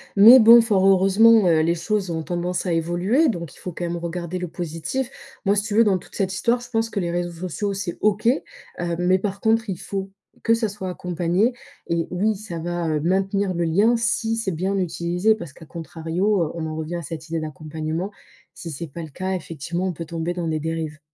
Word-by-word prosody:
mais 225 Hz, +6 st, +10 dB
bon, 235 Hz, +1 st, +9 dB
fort 195 Hz, -4 st, +3 dB
heureusement, 195 Hz, +2 st, +6 dB
heu, 160 Hz, -2 st, +4 dB
les 170 Hz, +2 st, +2 dB
choses 190 Hz, +2 st, -1 dB
ont 160 Hz, -1 st, -2 dB
tendance 175 Hz, +1 st, -2 dB
à 175 Hz, -, 0 dB
évoluer 175 Hz, -, +2 dB
donc 170 Hz, -, -4 dB
il -, -, -17 dB
faut, 180 Hz, -, -6 dB
quand 175 Hz, -, -6 dB
même, 170 Hz, 0 st, -2 dB
regarder 170 Hz, +1 st, -4 dB
le 180 Hz, -, -3 dB
positif. 170 Hz, +9 st, -4 dB, 0.4 s
Moi, 200 Hz, -, +3 dB
si 205 Hz, -, +1 dB
tu 205 Hz, -1 st, -3 dB
veux, 230 Hz, -, +7 dB
dans 195 Hz, -3 st, +3 dB
toute -, -, -14 dB
cette 190 Hz, -2 st, -1 dB
histoire, 235 Hz, +5 st, +1 dB
je 245 Hz, -, -11 dB
pense 225 Hz, -1 st, 0 dB
que 205 Hz, -, -3 dB
les 170 Hz, -2 st, -1 dB
réseaux 175 Hz, 0 st, -2 dB, 0.2 s
sociaux, 200 Hz, +4 st, -2 dB
c'est 190 Hz, -3 st, -4 dB
OK, 210 Hz, +1 st, +1 dB
heu, 240 Hz, -, -2 dB
mais 185 Hz, +1 st, +3 dB
par 200 Hz, 0 st, -3 dB
contre, 225 Hz, 0 st, +2 dB
il 185 Hz, -, -2 dB
faut 195 Hz, -1 st, -4 dB, 0.3 s
que 230 Hz, -, +4 dB
ça 225 Hz, -1 st, 0 dB
soit 190 Hz, -2 st, -6 dB
accompagné 180 Hz, +5 st, 0 dB, 0.3 s
et 170 Hz, -1 st, 0 dB
oui, 210 Hz, +4 st, +1 dB
ça 190 Hz, -5 st, -7 dB
va, 175 Hz, 0 st, -2 dB
heu, 155 Hz, -1 st, 0 dB
maintenir 195 Hz, +3 st, +1 dB
le 170 Hz, 0 st, -1 dB
lien 205 Hz, +9 st, +3 dB
si 225 Hz, 0 st, 0 dB
c'est 215 Hz, -4 st, -1 dB
bien 185 Hz, +4 st, -1 dB
utilisé 180 Hz, +3 st, +1 dB
parce 170 Hz, -9 st, -8 dB
qu'à 160 Hz, -, -14 dB
contrario, 170 Hz, +4 st, -1 dB
heu, 155 Hz, -, -3 dB
on 165 Hz, -1 st, -3 dB
en 155 Hz, -, -5 dB
revient 160 Hz, +2 st, -4 dB
à 170 Hz, -, -3 dB
cette 160 Hz, +1 st, -7 dB
idée 165 Hz, 0 st, -1 dB
d'accompagnement, 155 Hz, +4 st, -4 dB, 0.4 s
si 165 Hz, -, -8 dB
c'est 160 Hz, +4 st, -6 dB
pas 165 Hz, +4 st, -8 dB
le 160 Hz, -, -8 dB
cas, 185 Hz, +6 st, -3 dB
effectivement, 170 Hz, +1 st, -4 dB
on 180 Hz, -, -2 dB
peut 165 Hz, +1 st, -6 dB
tomber 165 Hz, +2 st, -3 dB
dans 175 Hz, -2 st, -3 dB
des 155 Hz, -1 st, -1 dB
dérives. 160 Hz, -1 st, -4 dB
180 Hz, 225 wpm, -23 LUFS, 165-205 Hz, 0.4 s, mais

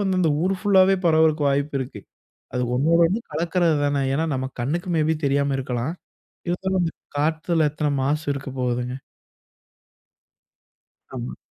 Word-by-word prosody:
வந்து 190 Hz, -2 st, +1 dB
அந்த 165 Hz, -4 st, +3 dB
ஊர் 190 Hz, +1 st, +1 dB
ஃபுல் 200 Hz, -2 st, +3 dB
ஆவே 190 Hz, +1 st, +4 dB
பரவுவதற்கு 155 Hz, -2 st, +3 dB
வாய்ப்பு 140 Hz, +1 st, 0 dB
இருக்கு. 130 Hz, -, -6 dB, 0.5 s
அது 125 Hz, -, -1 dB
ஒன்னோடு 165 Hz, +6 st, +3 dB
ஒன்னு 200 Hz, +7 st, -1 dB
கலக்குறது 170 Hz, +1 st, +1 dB
தானே. 145 Hz, -1 st, +1 dB
ஏன்னா, 160 Hz, +4 st, +1 dB
நம்ம 130 Hz, 0 st, -2 dB
கண்ணுக்கு 165 Hz, +9 st, -2 dB
மே 155 Hz, -, +3 dB
பி -, -, +2 dB
தெரியாம 140 Hz, 0 st, +1 dB
இருக்கலாம். 125 Hz, +3 st, -2 dB, 0.6 s
இருந்தாலும் 190 Hz, +2 st, 0 dB
அந்த 165 Hz, -, 0 dB, 0.3 s
காத்துல 160 Hz, +1 st, +1 dB
எத்தனை 150 Hz, -1 st, -1 dB
மாசு 150 Hz, +3 st, 0 dB
இருக்கப்போகுதுங்க? 125 Hz, -2 st, -3 dB, 2.2 s
ஆமா. -, -, -5 dB
150 Hz, 140 wpm, -23 LUFS, 135-170 Hz, 2.2 s, ஆவே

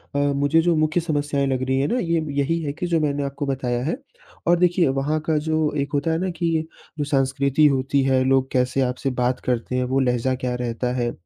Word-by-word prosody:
अ, -, -, +2 dB
मुझे 145 Hz, +3 st, +2 dB
जो 175 Hz, 0 st, +2 dB
मुख्य 155 Hz, +2 st, +1 dB
समस्याएँ 145 Hz, -3 st, -1 dB
लग 130 Hz, -1 st, -1 dB
रही 130 Hz, 0 st, +1 dB
हैं 140 Hz, -, +1 dB
ना, 250 Hz, -, 0 dB
ये 165 Hz, -5 st, 0 dB, 0.2 s
यही 165 Hz, +4 st, 0 dB
है 145 Hz, -2 st, -3 dB
कि 175 Hz, +3 st, -4 dB
जो 165 Hz, -2 st, +1 dB
मैंने 145 Hz, -2 st, 0 dB
आपको 140 Hz, +1 st, -4 dB
बताया 125 Hz, -3 st, -2 dB
है। 165 Hz, -, -1 dB, 0.5 s
और 175 Hz, -, +5 dB
देखिए 175 Hz, -2 st, +3 dB
वहाँ 135 Hz, +4 st, 0 dB
का 155 Hz, -1 st, +1 dB
जो 155 Hz, 0 st, 0 dB
एक 140 Hz, 0 st, -1 dB
होता 145 Hz, +3 st, 0 dB
है 160 Hz, -, +1 dB
ना 185 Hz, +1 st, -1 dB
कि, 165 Hz, -2 st, -1 dB, 0.3 s
जो 145 Hz, -, -1 dB
संस्कृति 140 Hz, +1 st, +2 dB
होती 135 Hz, 0 st, +1 dB
है, 130 Hz, -1 st, +2 dB
लोग 135 Hz, 0 st, +2 dB
कैसे 130 Hz, +1 st, +1 dB
आपसे 125 Hz, +1 st, -1 dB
बात 125 Hz, +1 st, +1 dB
करते 125 Hz, 0 st, -1 dB
हैं? 125 Hz, -, +1 dB
वो 130 Hz, +2 st, 0 dB
लहज़ा 125 Hz, 0 st, +1 dB
क्या 125 Hz, -1 st, -3 dB
रहता 125 Hz, 0 st, -2 dB
है? 120 Hz, -2 st, -1 dB
140 Hz, 230 wpm, -22 LUFS, 130-155 Hz, 0.5 s, और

